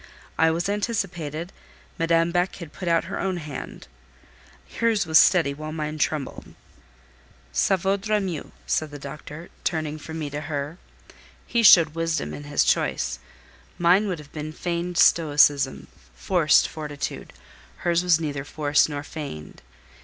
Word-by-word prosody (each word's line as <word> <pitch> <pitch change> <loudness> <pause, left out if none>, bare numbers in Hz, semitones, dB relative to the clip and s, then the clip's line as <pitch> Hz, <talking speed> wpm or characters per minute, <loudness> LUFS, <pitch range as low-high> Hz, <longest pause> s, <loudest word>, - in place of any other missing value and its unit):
I 160 0 +4
was 170 +3 -1
anticipated; 185 - -3 0.5
Madame 165 0 +2
Beck 175 +2 0
had 170 -5 -10
put 185 - -7
out 170 -1 +3
her - - -5
own 190 -2 -1
hand: 150 -4 -8 0.9
hers 230 -4 +2
was 160 0 +6
steady 165 -7 +4
while 155 +2 -7
mine 155 -1 -4
trembled. 150 -2 -3 1.0
"Ca 190 - +2
vaudra 200 +3 0
mieux," 180 -7 -4
said 155 - 0
the 145 - -8
doctor, 150 +3 -9
turning 155 -2 -2
from 160 +1 -7
me 150 -3 -4
to 145 +1 -4
her. 150 +2 -4 0.7
He 235 - +1
showed 170 -7 +7
wisdom 165 0 -2
in 145 - -8
his 145 - +2
choice. 65 -1 0 0.6
Mine 180 +5 +4
would 185 -3 -2
have 150 -1 -13
been 155 0 -5
feigned 175 +1 -3
stoicism, 145 -5 +4 0.3
forced - - +3
fortitude. 150 -2 -6 0.5
Hers 170 0 +3
was 175 -3 +3
neither 145 -4 -3
forced 145 +1 +1
nor 145 -1 -4
feigned. 140 - -8
160 Hz, 145 wpm, -24 LUFS, 150-175 Hz, 1.0 s, showed